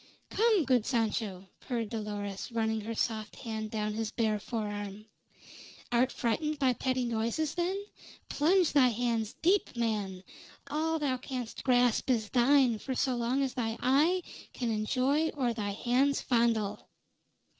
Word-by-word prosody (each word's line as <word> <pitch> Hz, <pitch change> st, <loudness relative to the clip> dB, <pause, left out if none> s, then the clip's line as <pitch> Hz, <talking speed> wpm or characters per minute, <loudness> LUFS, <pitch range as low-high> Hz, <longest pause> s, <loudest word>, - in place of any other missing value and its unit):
"Come, 435 Hz, -7 st, +3 dB
good 250 Hz, -4 st, +3 dB
Sancho," 220 Hz, -5 st, -1 dB
purred 235 Hz, -4 st, -3 dB
Dolores, 205 Hz, -2 st, -4 dB
running 220 Hz, -1 st, 0 dB
her 225 Hz, +2 st, -5 dB
soft 220 Hz, -2 st, -2 dB
hand 220 Hz, -2 st, -5 dB
down 215 Hz, -1 st, -2 dB
his 220 Hz, 0 st, -2 dB
bare 220 Hz, -2 st, 0 dB
forearm. 205 Hz, -2 st, -5 dB, 0.9 s
"Art 245 Hz, +2 st, +3 dB
frightened 300 Hz, +6 st, -1 dB
by 265 Hz, -3 st, +3 dB
petty 255 Hz, 0 st, -1 dB
noises, 235 Hz, +6 st, -1 dB
then? 360 Hz, +3 st, -1 dB, 0.5 s
Plunge 345 Hz, +4 st, +3 dB
thy 275 Hz, -4 st, +6 dB
hands 230 Hz, -2 st, -1 dB
deep, 375 Hz, -4 st, +2 dB
man! 205 Hz, -5 st, -1 dB, 0.5 s
All 320 Hz, +2 st, 0 dB
thou 280 Hz, -4 st, 0 dB
canst 250 Hz, -2 st, -6 dB
grasp 245 Hz, -1 st, +3 dB
is 220 Hz, -4 st, +1 dB
thine 255 Hz, -2 st, +4 dB
for 260 Hz, +3 st, -4 dB
so 255 Hz, 0 st, +1 dB
long 240 Hz, +3 st, 0 dB
as 265 Hz, -, -2 dB
thy 225 Hz, -3 st, -2 dB
eye 310 Hz, +8 st, +3 dB, 0.3 s
can 240 Hz, -2 st, -2 dB
enjoy 260 Hz, +8 st, +1 dB
or 250 Hz, -4 st, 0 dB
thy 210 Hz, -3 st, -3 dB
hands 250 Hz, +7 st, +1 dB
fondle." 230 Hz, -4 st, 0 dB
240 Hz, 145 wpm, -30 LUFS, 220-270 Hz, 0.9 s, thy